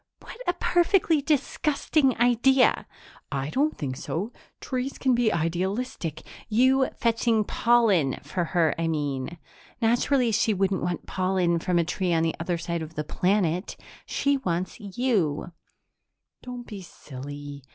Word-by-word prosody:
"What 480 Hz, -, -11 dB
a 355 Hz, -, +3 dB
perfectly 350 Hz, -3 st, +2 dB
disgusting 290 Hz, -1 st, +1 dB
idea!" 245 Hz, +2 st, +3 dB, 0.4 s
"I 135 Hz, +1 st, -2 dB
don't 295 Hz, +4 st, +1 dB
think 135 Hz, -4 st, -3 dB
so. 200 Hz, +9 st, -4 dB, 0.3 s
Trees 260 Hz, +1 st, -3 dB
can 260 Hz, -2 st, +2 dB
be 240 Hz, -2 st, +2 dB
idealistic 175 Hz, -, -2 dB
" -, -, -20 dB
"You 265 Hz, +1 st, +4 dB
fetching 230 Hz, -1 st, +2 dB
pollen 210 Hz, -, +3 dB
for 170 Hz, +5 st, -2 dB
her, 165 Hz, -2 st, +2 dB
I 165 Hz, -, 0 dB
mean. 145 Hz, 0 st, -2 dB, 0.4 s
Naturally 240 Hz, +2 st, +2 dB
she 220 Hz, 0 st, +2 dB
wouldn't 195 Hz, 0 st, 0 dB
want 175 Hz, -1 st, -3 dB
pollen 185 Hz, -2 st, +1 dB
from 180 Hz, +1 st, 0 dB
a 170 Hz, -, +3 dB
tree 180 Hz, +2 st, -1 dB
on 165 Hz, -1 st, +2 dB
the 165 Hz, -, +1 dB
other 170 Hz, +1 st, -1 dB
side 170 Hz, 0 st, -3 dB
of 160 Hz, +1 st, -8 dB
the 150 Hz, -, -2 dB
planet. 180 Hz, +2 st, 0 dB, 0.3 s
She 280 Hz, 0 st, +1 dB
wants 180 Hz, -6 st, -3 dB
you!" 200 Hz, -, -1 dB, 0.9 s
"Don't 245 Hz, -1 st, -7 dB
be 205 Hz, -4 st, -8 dB
silly. 145 Hz, -3 st, -9 dB
190 Hz, 140 wpm, -26 LUFS, 165-250 Hz, 0.9 s, You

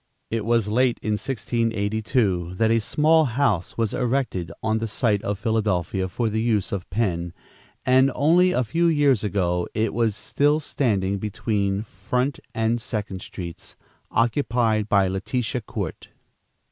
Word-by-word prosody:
It 110 Hz, -2 st, -1 dB
was 115 Hz, -2 st, +2 dB
late 120 Hz, +3 st, +2 dB
in 110 Hz, -, -1 dB
1682 110 Hz, -5 st, -1 dB
that 110 Hz, +4 st, +2 dB
a 115 Hz, -, +4 dB
small 155 Hz, +7 st, +3 dB
house 110 Hz, -8 st, 0 dB
was 115 Hz, -2 st, 0 dB
erected 120 Hz, -9 st, -1 dB
on 110 Hz, 0 st, +1 dB
the 115 Hz, -, -2 dB
site 110 Hz, -2 st, +1 dB
of 100 Hz, -2 st, -2 dB
Philadelphia 100 Hz, -4 st, 0 dB
for 115 Hz, +6 st, -2 dB
the 110 Hz, 0 st, -1 dB
use 110 Hz, -4 st, 0 dB
of 95 Hz, -3 st, -4 dB
Penn, 85 Hz, -5 st, -1 dB, 0.5 s
and 130 Hz, +1 st, +5 dB
only 175 Hz, +5 st, +4 dB
a 130 Hz, -, +1 dB
few 165 Hz, +8 st, +1 dB
years 145 Hz, -8 st, +3 dB
ago 90 Hz, -3 st, 0 dB
it 110 Hz, 0 st, 0 dB
was 115 Hz, -2 st, +1 dB
still 145 Hz, +6 st, +1 dB
standing 100 Hz, -10 st, 0 dB
between 100 Hz, -1 st, -1 dB
Front 125 Hz, +7 st, -2 dB, 0.2 s
and 115 Hz, +1 st, +1 dB
Second 105 Hz, -5 st, -4 dB
Streets, 85 Hz, -2 st, -8 dB, 0.3 s
occupied 115 Hz, -3 st, +1 dB
by 100 Hz, -2 st, +4 dB
Letitia 110 Hz, +6 st, -2 dB
Court. 105 Hz, -, -5 dB
110 Hz, 145 wpm, -24 LUFS, 100-125 Hz, 0.5 s, and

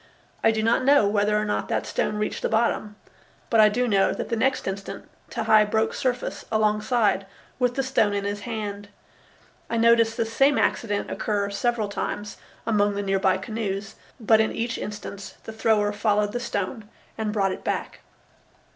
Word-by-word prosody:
I -, -, +6 dB
do 220 Hz, -1 st, 0 dB
not 230 Hz, +3 st, +2 dB
know 280 Hz, -4 st, +5 dB
whether 205 Hz, +1 st, +2 dB
or 210 Hz, -, -1 dB
not 210 Hz, -, -1 dB
that -, -, -1 dB
stone -, -, -1 dB
reached 210 Hz, 0 st, -2 dB
the -, -, 0 dB
bottom, 220 Hz, -2 st, 0 dB, 0.6 s
but 225 Hz, -, +4 dB
I 215 Hz, -1 st, +8 dB
do 245 Hz, +4 st, 0 dB
know 195 Hz, -3 st, +3 dB
that -, -, -5 dB
the 230 Hz, -, 0 dB
next 260 Hz, +4 st, 0 dB
instant 195 Hz, 0 st, -5 dB, 0.2 s
Tehei 215 Hz, -1 st, +3 dB
broke 220 Hz, +1 st, +1 dB
surface 250 Hz, -1 st, -2 dB
alongside 215 Hz, -1 st, +1 dB, 0.3 s
with 245 Hz, -1 st, +1 dB
the 270 Hz, -, 0 dB
stone 225 Hz, -6 st, +1 dB
in 200 Hz, -, -1 dB
his 205 Hz, 0 st, -2 dB
hand. 205 Hz, -2 st, -5 dB, 0.8 s
I 230 Hz, -, -1 dB
noticed 230 Hz, 0 st, +4 dB
this 225 Hz, 0 st, -2 dB
same 275 Hz, +2 st, +4 dB
accident 205 Hz, -3 st, 0 dB
occur 200 Hz, -2 st, -1 dB
several 225 Hz, +1 st, 0 dB
times 205 Hz, +1 st, -4 dB, 0.3 s
among 205 Hz, -2 st, +2 dB
the 205 Hz, -, -2 dB
near 195 Hz, -1 st, +1 dB
by 190 Hz, -1 st, +3 dB
canoes, 200 Hz, 0 st, -4 dB, 0.3 s
but 220 Hz, -1 st, +4 dB
in 220 Hz, -, 0 dB
each 230 Hz, +1 st, -2 dB
instance 205 Hz, -1 st, -7 dB
the 220 Hz, -, -8 dB
thrower 215 Hz, -2 st, +2 dB
followed 210 Hz, 0 st, +1 dB
the 245 Hz, -, -3 dB
stone 210 Hz, -1 st, -4 dB, 0.3 s
and 220 Hz, -1 st, -2 dB
brought 195 Hz, -3 st, +1 dB
it -, -, -6 dB
back. -, -, -3 dB
215 Hz, 180 wpm, -25 LUFS, 205-230 Hz, 0.8 s, I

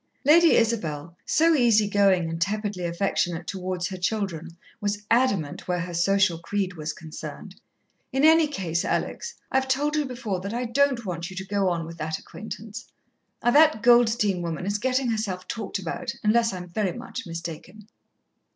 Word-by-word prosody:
Lady 330 Hz, +3 st, +6 dB
Isabel, 170 Hz, -9 st, 0 dB
so 330 Hz, +1 st, +4 dB
easy 230 Hz, -7 st, +4 dB
going 195 Hz, -4 st, +3 dB
and 165 Hz, 0 st, -5 dB
tepidly 205 Hz, -1 st, -1 dB
affectionate 170 Hz, -1 st, -1 dB
towards 185 Hz, -1 st, -3 dB
her 190 Hz, -, -6 dB
children, 180 Hz, -4 st, -3 dB, 0.2 s
was 205 Hz, 0 st, -2 dB
adamant 200 Hz, -, +1 dB
where 180 Hz, -1 st, 0 dB
her 180 Hz, 0 st, -5 dB
social 180 Hz, 0 st, +2 dB
creed 185 Hz, +2 st, -2 dB
was 155 Hz, -2 st, -4 dB
concerned. 155 Hz, 0 st, -9 dB, 0.6 s
"In 270 Hz, +2 st, +2 dB
any 320 Hz, 0 st, +6 dB
case, 180 Hz, -, -2 dB
Alex, 470 Hz, -, -2 dB, 0.2 s
I've 265 Hz, 0 st, +1 dB
told 290 Hz, +3 st, +1 dB
you 300 Hz, -1 st, +1 dB
before 240 Hz, -7 st, -3 dB
that 200 Hz, +5 st, -5 dB
I 245 Hz, +1 st, -1 dB
don't 255 Hz, -1 st, +1 dB
want 170 Hz, -2 st, -4 dB
you 190 Hz, -, -10 dB
to 190 Hz, +1 st, -5 dB
go 195 Hz, -1 st, +1 dB
on 170 Hz, -2 st, -2 dB
with 165 Hz, 0 st, -10 dB
the 155 Hz, +1 st, -2 dB
acquaintance. 220 Hz, +1 st, -9 dB, 0.6 s
That 285 Hz, -1 st, +5 dB
Goldstein 230 Hz, -6 st, +4 dB
woman 170 Hz, +1 st, -4 dB
is 205 Hz, +1 st, -1 dB
gettin' 255 Hz, +2 st, +1 dB
herself 195 Hz, -5 st, -3 dB
talked 215 Hz, -2 st, -4 dB
about, 180 Hz, -4 st, -4 dB
unless 230 Hz, +2 st, +3 dB
I'm 180 Hz, -1 st, -6 dB
very 195 Hz, +3 st, -1 dB
much 245 Hz, -1 st, -7 dB
mistaken." 170 Hz, +5 st, -8 dB
200 Hz, 165 wpm, -25 LUFS, 175-235 Hz, 0.6 s, Lady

